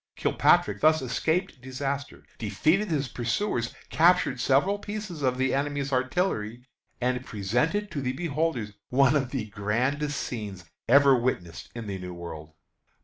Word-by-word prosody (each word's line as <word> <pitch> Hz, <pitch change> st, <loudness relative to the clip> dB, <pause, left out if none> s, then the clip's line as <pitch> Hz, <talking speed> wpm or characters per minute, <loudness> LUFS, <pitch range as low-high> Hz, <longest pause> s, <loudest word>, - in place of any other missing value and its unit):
Kilpatrick 100 Hz, -1 st, +3 dB
thus 155 Hz, +1 st, +5 dB
escaped 160 Hz, +5 st, -1 dB
disaster, 135 Hz, +2 st, -4 dB, 0.2 s
defeated 155 Hz, -, +1 dB
his 145 Hz, -4 st, 0 dB
pursuers, 120 Hz, -, -1 dB, 0.2 s
captured 170 Hz, -6 st, +4 dB
several 140 Hz, -, +2 dB
pieces 205 Hz, -6 st, -6 dB
of 130 Hz, -2 st, +1 dB
the 130 Hz, 0 st, +1 dB
enemy's 140 Hz, 0 st, -1 dB
artillery, 125 Hz, -, -1 dB, 0.4 s
and 125 Hz, 0 st, 0 dB
presented 125 Hz, -, -1 dB
to 145 Hz, -4 st, -3 dB
the 130 Hz, -1 st, -1 dB
beholders 150 Hz, -7 st, -1 dB, 0.2 s
one 135 Hz, +2 st, +4 dB
of 135 Hz, -4 st, +1 dB
the 125 Hz, -5 st, -3 dB
grandest 130 Hz, +8 st, -1 dB
scenes 100 Hz, -7 st, -5 dB, 0.2 s
ever 140 Hz, +1 st, +7 dB
witnessed 85 Hz, -11 st, -2 dB
in 115 Hz, -2 st, -5 dB
the 100 Hz, -2 st, -4 dB
New 90 Hz, -1 st, -7 dB
World. 80 Hz, -2 st, -9 dB
130 Hz, 140 wpm, -27 LUFS, 115-150 Hz, 0.4 s, ever